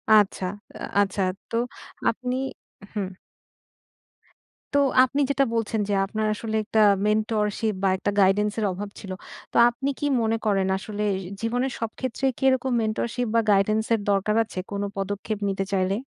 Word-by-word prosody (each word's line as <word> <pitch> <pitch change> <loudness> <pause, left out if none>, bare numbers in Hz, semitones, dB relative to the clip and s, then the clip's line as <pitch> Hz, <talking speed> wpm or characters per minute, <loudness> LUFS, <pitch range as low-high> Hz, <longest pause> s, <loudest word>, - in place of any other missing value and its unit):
আচ্ছা, 200 -2 +3 0.6
আচ্ছা। 195 0 0 0.3
তো - - -4 0.5
আপনি 250 +2 -2 0.6
হু। 210 - -2 1.7
তো 285 - +4 0.3
আপনি 280 +3 +1
যেটা 275 -1 +3
বলছেন 225 -1 0
যে 205 - +1
আপনার 215 +2 -2
আসলে 220 0 -4
একটা 220 +1 0 0.3
মেন্টরশিপ 215 0 +1
বা 195 - +4
একটা 200 +2 -1
গাইডেন্সের 210 +3 +2
অভাব 200 +3 -5
ছিল। 195 - -8 0.4
তো - - -1
আপনি 265 +4 -3
কি - - -1 0.2
মনে 225 0 +1
করেন 195 -3 +2
আসলে 210 +1 -4
এ - - -2 0.2
জীবনের 245 +3 0
সব 225 - -1
ক্ষেত্রেই 260 +1 0
কি 270 - -7
এরকম 260 0 +1
মেন্টরশিপ 235 +2 -1
বা 230 - +5
গাইডেন্সের 215 +3 +2
দরকার 200 +2 +1
আছে 190 - -7
কোনো 200 0 -2
পদক্ষেপ 205 +2 -3
নিতে 195 0 -1
চাইলে? 190 +1 +1
215 Hz, 150 wpm, -25 LUFS, 200-230 Hz, 1.7 s, বা